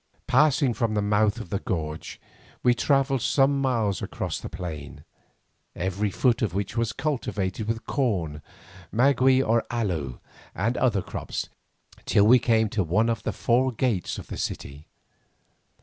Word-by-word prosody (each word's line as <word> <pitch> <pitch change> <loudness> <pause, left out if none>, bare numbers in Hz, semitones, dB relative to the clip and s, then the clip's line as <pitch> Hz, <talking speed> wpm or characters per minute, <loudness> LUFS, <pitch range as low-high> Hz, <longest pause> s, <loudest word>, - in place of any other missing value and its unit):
Passing 140 -1 +3
from 115 -2 -1
the 105 - +2
mouth 105 +2 +2
of 110 -6 -9
the 100 - 0
gorge 80 -6 -4 0.4
we 125 - +5
travelled 135 +1 +1
some 140 +2 +2
miles 115 -7 0
across - - -4
the - - -7
plain, 75 -4 -7 0.7
every 95 +3 -1
foot 120 +4 +1
of 100 -5 -1
which 100 +2 -2
was 115 -1 0
cultivated 110 -9 -2
with 115 0 -3
corn, 90 - -1 0.5
maguey 130 +2 +4
or 115 -1 +2
aloe, 85 - -2 0.4
and 115 +6 0
other 110 -7 +1
crops, - - -5 0.6
till 100 - +4
we 125 +4 +7
came 110 -2 +2
to 100 -2 0
one 105 +8 +2
of 115 -2 -1
the - - -2
four 130 +2 +1
gates 115 -6 -1
of - - -7
the - - -7
city. 70 +3 -5
110 Hz, 150 wpm, -26 LUFS, 95-125 Hz, 0.7 s, we